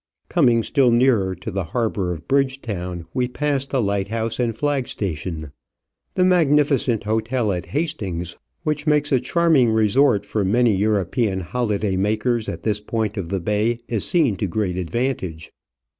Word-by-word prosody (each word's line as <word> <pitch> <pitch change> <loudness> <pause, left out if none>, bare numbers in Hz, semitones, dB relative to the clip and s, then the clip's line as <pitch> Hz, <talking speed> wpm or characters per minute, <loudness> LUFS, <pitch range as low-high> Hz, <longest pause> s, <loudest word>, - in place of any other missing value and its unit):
Coming 120 -9 +3
still 135 -1 +3
nearer 115 -6 +3
to 95 +5 -7
the 95 -2 -2
harbour 105 -6 0
of 80 -1 -7
Bridgetown 110 -11 -1
we 125 -1 0
pass 140 +1 -1
the 135 - -1
lighthouse 110 +3 -1
and 115 -3 0
flag 145 -2 0
station. 80 -5 -4 0.6
The 180 - +3
magni 155 -5 +4
ficent 130 -6 0
hotel 110 +1 0
at 90 -2 -3
Hastings, 95 - -3 0.3
which 150 0 -2
makes 150 0 +2
a 130 - +4
charming 150 -2 +3
resort 110 +1 +3
for 105 - -1
many 115 +3 +3
European 100 0 0
holiday 105 -1 -1
makers, 110 +3 0
at 85 0 -6
this 105 -2 0
point 110 -1 -2
of 95 -5 -4
the 95 - -1
bay 105 +6 0
is 115 -4 -1
seen 145 - +2
to 100 - -1
great 95 0 -1
advantage. 95 -4 -3
110 Hz, 160 wpm, -22 LUFS, 95-130 Hz, 0.6 s, magni